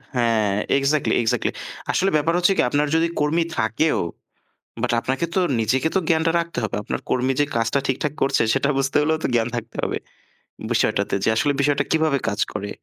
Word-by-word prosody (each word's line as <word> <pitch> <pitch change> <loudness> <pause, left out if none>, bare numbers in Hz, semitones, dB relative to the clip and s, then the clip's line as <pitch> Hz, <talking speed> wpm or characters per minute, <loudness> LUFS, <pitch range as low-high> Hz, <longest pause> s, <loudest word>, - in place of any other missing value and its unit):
হ্যাঁ 115 -4 +2 0.3
exactly, 140 +2 +1
exactly. 120 +1 0 0.4
আসলে 195 +1 +2
ব্যাপার 160 +3 +2
হচ্ছে 180 +2 +3
কি - - +5
আপনার 145 +2 +1
যদি 165 +1 +3
কর্মী 155 +3 +2
থাকেও 110 +9 +1 0.8
বাট - - 0
আপনাকে 130 +7 -2
তো 190 - +3 0.2
নিজেকে 130 +8 +1
তো - - +4
জ্ঞানটা 165 0 +2
রাখতে 170 -5 -6
হবে। 105 - -3
আপনার - - -4
কর্মী 130 +1 +1
যে - - +5
কাজটা 115 +4 +1
ঠিকঠাক 135 +2 -1
করছে 135 - +2
সেটা 135 +1 +1
বুঝতে 135 +1 0
হলেও 160 +1 +1
তো - - +1
জ্ঞান 115 0 +2
থাকতে 115 0 -6
হবে। - - -1 0.7
বিষয়টাতে - - +1
যে - - +3
আসলে 145 +6 +2
বিষয়টা 145 0 +2
কীভাবে 155 -3 +2
কাজ 105 -1 -2
করে। 100 0 -4
140 Hz, 180 wpm, -22 LUFS, 115-160 Hz, 0.8 s, কি